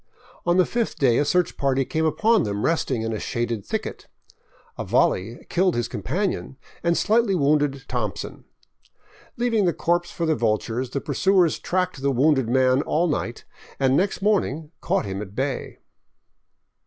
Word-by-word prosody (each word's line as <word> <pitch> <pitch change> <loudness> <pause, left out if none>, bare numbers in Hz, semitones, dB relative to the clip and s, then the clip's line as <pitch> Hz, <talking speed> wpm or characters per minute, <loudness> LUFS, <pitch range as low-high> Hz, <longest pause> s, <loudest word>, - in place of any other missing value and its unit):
On 175 +1 +3
the 185 - +5
fifth 235 -2 -2
day 125 -4 +3
a 145 - +2
search 180 +3 +1
party 135 -1 +1
came 160 +4 -1
upon 215 +8 +3
them 100 -6 -2
resting 155 -8 0
in 115 0 -2
a 110 - -3
shaded 115 -3 -2
thicket. - - -5 0.7
A - - -4
volley 110 +6 0
killed 180 0 +1
his 120 -1 -1
companion 140 - -3 0.2
and 170 0 +1
slightly 220 -2 +2
wounded 145 -3 +1
" - - -38
Thompson." 110 -7 -4 0.9
Leaving 230 -4 +1
the 175 - +2
corpse 175 +1 0
for 170 - -3
the 160 - +2
vultures, 115 +1 -1
the 140 +2 -3
pursuers 180 +4 +2
tracked 180 -5 -1
the 140 - +1
wounded 135 -2 +2
man 130 +1 +3
all 160 +3 +1
night 120 -6 -3 0.3
and 135 -1 +3
next 195 +4 0
morning 165 -7 0
caught - - 0
him 95 0 -4
at 100 -1 -9
bay. 135 +1 -3
145 Hz, 165 wpm, -23 LUFS, 125-175 Hz, 0.9 s, the